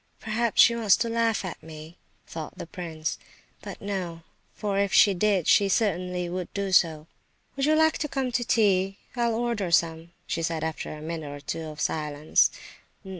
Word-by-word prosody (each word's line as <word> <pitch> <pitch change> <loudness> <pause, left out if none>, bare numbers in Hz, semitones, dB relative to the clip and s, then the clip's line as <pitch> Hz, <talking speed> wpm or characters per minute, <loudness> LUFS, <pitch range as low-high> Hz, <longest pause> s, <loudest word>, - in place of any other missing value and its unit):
"Perhaps 225 +1 +3
she 235 - +4
wants 220 -5 +4
to 235 - -1
laugh 230 -3 0
at 185 - -6
me," 160 +1 -11 0.3
thought 160 -2 -8
the - - -6
prince, 165 -4 -5 0.4
"but - - -8
no; 180 -5 -4 0.3
for 200 -2 -1
if 200 -1 +1
she 200 - +6
did 190 -2 +1
she 200 -1 +5
certainly 180 -4 0
would 180 0 -5
do 200 -1 -2
so." 160 -4 +3 0.5
"Would 275 0 0
you 310 - +4
like 315 0 +3
some 270 -4 -2
tea? 200 -5 +2 0.2
I'll 235 -2 +1
order 230 -5 -1
some," 165 0 +1 0.2
she 165 - -2
said, 165 -1 -2
after 160 -1 -4
a 150 0 -8
minute 160 -2 -5
or 145 - -7
two 160 +3 -5
of 155 -1 -9
silence. 150 0 +1
185 Hz, 175 wpm, -26 LUFS, 160-220 Hz, 0.5 s, she